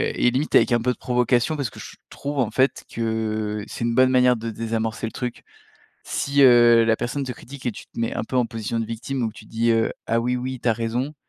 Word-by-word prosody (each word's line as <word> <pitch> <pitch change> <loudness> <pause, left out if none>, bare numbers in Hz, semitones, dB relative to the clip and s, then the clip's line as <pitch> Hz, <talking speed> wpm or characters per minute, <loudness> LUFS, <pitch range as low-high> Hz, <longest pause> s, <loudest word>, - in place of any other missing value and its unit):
et 125 - +3
limite 140 +5 -1
avec 115 - +5
un 120 - +2
peu 125 - +1
de - - -6
provocation 125 +3 +1
parce 140 -5 -2
que - - -13
je - - -10
trouve 145 0 -5
en 115 -4 +1
fait 130 +4 +1
que 110 -2 -2
c'est 115 - -4
une 115 0 0
bonne 130 +1 +5
manière 125 -1 +4
de 115 0 -5
désamorcer 115 0 -3
le - - -7
truc. 125 -2 -5 0.6
Si, 140 0 +1
heu, 120 -2 +7
la 115 0 +2
personne 130 +5 -3
te 130 - -4
critique 130 +2 -11
et 120 - 0
tu - - -11
te - - -14
mets 115 0 -1
un - - -2
peu 130 - -4
en 125 -2 +3
position 115 -1 -4
de 115 - -1
victime 115 +4 -4
donc 115 -2 -1
tu 110 0 -14
dis, 115 +2 0
heu: 115 0 +2 0.2
«Ah 115 +1 +1
oui 125 +2 0
oui, 130 0 -4
tu - - 0
as - - +5
raison», 120 +6 -2
120 Hz, 255 wpm, -23 LUFS, 115-125 Hz, 0.6 s, heu